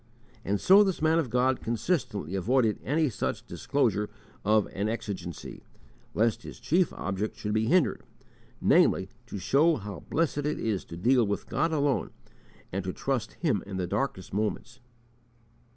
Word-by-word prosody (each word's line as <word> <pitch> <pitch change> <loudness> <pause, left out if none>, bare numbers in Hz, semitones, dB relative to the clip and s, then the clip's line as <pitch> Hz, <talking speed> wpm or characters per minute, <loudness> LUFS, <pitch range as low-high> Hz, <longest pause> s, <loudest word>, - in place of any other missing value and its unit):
And 100 +1 0
so 195 +3 +7
this 190 -3 -1
man 160 +1 +3
of 145 -7 -1
God 125 +2 +2
consistently 115 - -2
avoided 110 +3 +2
any 155 +3 +1
such 120 - -3
disclosure 105 +1 0 0.3
of 105 0 +3
an 100 +3 -1
exigency, 95 -7 -5 0.5
lest 115 0 +2
his - - -10
chief 175 +2 +2
object 100 +3 -3
should 105 0 -3
be 110 +1 +1
hindered, 175 +3 +3 0.6
namely, 95 0 +4 0.2
"to 105 - -6
show 140 - +3
how 100 - -6
blessed 160 -2 +1
it 150 +1 -1
is 105 -4 -1
to 85 - -9
deal 120 +4 +3
with 100 - -2
God 165 - 0
alone, 145 -3 +1 0.6
and 95 +1 -2
to 95 - -3
trust 130 -5 -2
Him 140 - 0
in 95 -2 -5
the 90 - -1
darkest 95 -1 -3
moments." 110 +4 -2
115 Hz, 155 wpm, -28 LUFS, 100-145 Hz, 0.6 s, so